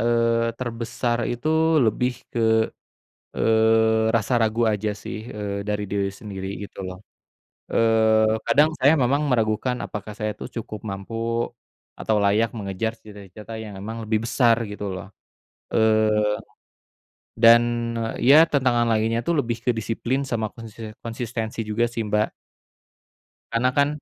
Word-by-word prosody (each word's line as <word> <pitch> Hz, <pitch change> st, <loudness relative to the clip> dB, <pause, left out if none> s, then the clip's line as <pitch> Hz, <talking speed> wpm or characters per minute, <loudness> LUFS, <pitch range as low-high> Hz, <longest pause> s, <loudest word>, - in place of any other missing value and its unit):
eee, 115 Hz, 0 st, +2 dB
terbesar 120 Hz, 0 st, -2 dB
itu 120 Hz, +6 st, -3 dB, 0.4 s
lebih 125 Hz, +3 st, -1 dB
ke, 110 Hz, -1 st, +3 dB, 0.8 s
eee, 110 Hz, 0 st, +3 dB
rasa 115 Hz, +2 st, +2 dB
ragu 115 Hz, +1 st, +1 dB
aja 105 Hz, 0 st, -1 dB
sih, 105 Hz, +1 st, -7 dB
eee, 100 Hz, -3 st, -5 dB
dari 105 Hz, 0 st, -1 dB
diri 100 Hz, -1 st, 0 dB
sendiri, 95 Hz, -3 st, -7 dB, 0.2 s
gitu 100 Hz, -, -10 dB
loh. 90 Hz, 0 st, -7 dB, 0.8 s
Eee, 110 Hz, -1 st, +3 dB
kadang 145 Hz, +7 st, +4 dB
saya 135 Hz, +4 st, +5 dB
memang 140 Hz, 0 st, +2 dB
meragukan 120 Hz, -1 st, +1 dB
apakah 105 Hz, 0 st, -6 dB
saya 105 Hz, +1 st, -3 dB
tuh -, -, -7 dB
cukup 110 Hz, -2 st, -7 dB
mampu, 115 Hz, +4 st, -3 dB, 0.4 s
atau 110 Hz, -, -1 dB
layak 105 Hz, +3 st, +2 dB
mengejar 105 Hz, +3 st, -3 dB
cita-cita 105 Hz, +1 st, -11 dB
yang 105 Hz, -3 st, -8 dB
memang 110 Hz, +4 st, -6 dB
lebih 110 Hz, +1 st, 0 dB
besar, 115 Hz, -1 st, +3 dB
gitu 100 Hz, -1 st, -5 dB
loh. 95 Hz, +1 st, -7 dB, 0.7 s
Eee, 110 Hz, -1 st, +3 dB, 1.0 s
dan, 115 Hz, +1 st, +8 dB, 0.6 s
ya, 150 Hz, +6 st, +7 dB
tentangan 125 Hz, -4 st, +2 dB
lainnya 110 Hz, +1 st, +1 dB
itu -, -, -2 dB
lebih 120 Hz, -6 st, -1 dB
ke 125 Hz, -, +1 dB
disiplin 115 Hz, +4 st, -2 dB
sama 115 Hz, -4 st, -1 dB
konsisen 115 Hz, -1 st, -9 dB
konsistensi 115 Hz, -1 st, -4 dB
juga 115 Hz, +3 st, +1 dB
sih, 115 Hz, -1 st, -3 dB
Mbak. 105 Hz, +1 st, +1 dB, 1.2 s
Karena 115 Hz, +2 st, +2 dB
kan, 140 Hz, +1 st, +3 dB
110 Hz, 130 wpm, -23 LUFS, 105-120 Hz, 1.2 s, dan